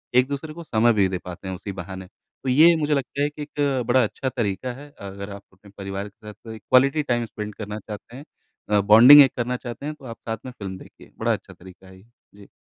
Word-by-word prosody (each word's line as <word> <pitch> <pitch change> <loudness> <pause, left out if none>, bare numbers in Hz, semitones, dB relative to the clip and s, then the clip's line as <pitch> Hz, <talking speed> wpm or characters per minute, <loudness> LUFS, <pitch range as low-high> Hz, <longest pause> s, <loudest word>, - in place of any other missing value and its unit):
एक-दूसरे 140 +4 +1
को 170 +1 -9
समय 120 -4 +3
भी 100 -3 +3
दे 95 - -2
पाते 90 +1 -8
हैं 95 - -4
उसी 100 +2 -7
बहाने। 95 0 -9
तो 130 +6 -10
ये 160 +6 +6
मुझे 150 -1 0
लगता 140 0 -2
है 145 - +1
कि 150 0 -11
एक 140 -3 -1
बड़ा 125 0 +4
अच्छा 130 +4 -3
तरीका 120 0 -3
है। 145 - -12
अगर 100 0 -8
आप 100 - -11
अपने 100 +1 -19
परिवार 100 0 -5
के 105 +1 -18
साथ 105 - -8
कोई 110 -1 -8
क्वालिटी 135 +6 +3
टाइम 120 -3 0
स्पेंड 105 -1 -7
करना 105 0 -6
चाहते 105 +3 -10
हैं 135 - -9 0.5
अ, 105 -1 +3
बॉन्डिंग 115 +8 +9
एक 135 - +4
करना 125 +1 -1
चाहते 120 +3 -8
हैं 150 0 -4
तो 135 - -14
आप 115 -2 -8
साथ 115 - -2
में 130 - -6
फ़िल्म 100 -6 -7
देखिए। - - -16
बड़ा - - +1
अच्छा - - -7
तरीका 95 +1 -16
है 95 0 -15
ये। - - -20 0.3
जी। 100 -1 -15
115 Hz, 245 wpm, -23 LUFS, 100-135 Hz, 0.5 s, बॉन्डिंग